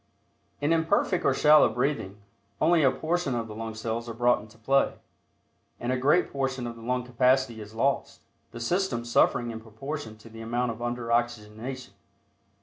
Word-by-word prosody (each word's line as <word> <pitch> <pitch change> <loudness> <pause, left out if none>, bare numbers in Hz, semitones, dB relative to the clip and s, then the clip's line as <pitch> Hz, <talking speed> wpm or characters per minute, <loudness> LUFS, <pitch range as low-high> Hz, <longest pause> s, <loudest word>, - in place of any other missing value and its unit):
In 145 +3 +2
imperfect 170 +3 +1
or - - +4
shallow 150 0 +6
breathing, 125 -7 -2 0.4
only 165 +1 +4
a 135 - +5
portion 160 -2 -1
of 115 -1 -2
the 110 - -8
lung 110 0 -6
cells 115 +1 -3
are 115 - -6
brought 120 +1 +3
into 110 +1 -15
play, 135 +5 +2 0.8
and 120 - -2
a - - +2
great 145 +8 +2
portion 135 -2 -2
of 120 -1 -5
the 115 - -12
lung 125 +2 -1
capacity 125 -1 +2
is 105 +1 -11
lost, 135 +5 0 0.3
the 115 - -9
system 120 -2 -1
suffering 120 0 +2
in 110 -1 -7
proportion 110 +1 -7
to 110 - -15
the 115 0 -10
amount 120 +2 -1
of 115 +1 -9
under 120 -1 -3
oxygenation. 120 0 -2
120 Hz, 175 wpm, -27 LUFS, 115-135 Hz, 0.8 s, shallow